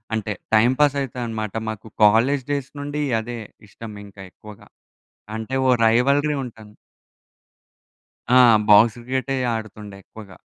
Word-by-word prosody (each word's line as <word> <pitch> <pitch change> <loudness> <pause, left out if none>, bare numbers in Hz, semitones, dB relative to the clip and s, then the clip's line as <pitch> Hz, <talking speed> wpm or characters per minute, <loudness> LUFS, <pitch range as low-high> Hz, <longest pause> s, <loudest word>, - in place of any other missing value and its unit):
అంటే, 105 -1 -3 0.2
టైంపాసయితా 130 +2 +1
అనమాట. 110 -2 -5 0.2
మాకు 110 0 -8 0.2
కాలేజ్ 125 +6 +3
డేస్ 140 -2 -3
నుండీ 145 +1 -4 0.2
అదే 120 +2 -7 0.3
ఇష్టమింక 105 -2 -11 0.2
ఎక్కువగా. 105 +1 -15 0.7
అంటే 110 +4 -6
ఓ - - +5 0.2
రైవల్రీ 140 +6 +2
ఉంటాను. 110 -3 -13 1.6
ఆ! - - +5 0.3
బాక్స్ 105 +2 +6
క్రికెటే 130 +3 -3 0.2
ఆడుతుండే 105 -2 -8
ఎక్కువగా. 100 -3 -14
115 Hz, 110 wpm, -21 LUFS, 105-135 Hz, 1.6 s, బాక్స్